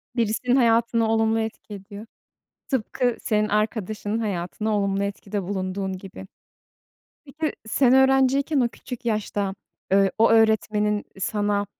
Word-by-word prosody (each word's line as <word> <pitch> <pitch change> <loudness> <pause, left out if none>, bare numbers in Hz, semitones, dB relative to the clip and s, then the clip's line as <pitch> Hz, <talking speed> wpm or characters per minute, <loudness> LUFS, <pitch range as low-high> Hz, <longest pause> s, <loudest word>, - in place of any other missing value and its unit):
Birisinin 235 +2 +1
hayatına 230 -2 +3
olumlu 225 0 +2
etki 220 -1 -5
ediyor. 200 +2 -9 0.6
Tıpkı 245 -1 0
senin 215 -1 0
arkadaşının 215 0 -1
hayatına 210 +1 -2
olumlu 200 0 0
etkide 200 0 -4
bulunduğun 190 0 -3
gibi. 190 0 -10 1.0
Peki, 305 +2 -3
sen 255 +3 +3
öğrenciyken, 270 +2 +3
o 245 - +3
küçük 250 0 -9
yaşta, 205 -3 -1 0.4
ııı, 195 -1 +5
o 225 +1 +5
öğretmenin 215 -2 +2
sana 205 0 0
215 Hz, 115 wpm, -24 LUFS, 200-235 Hz, 1.0 s, ııı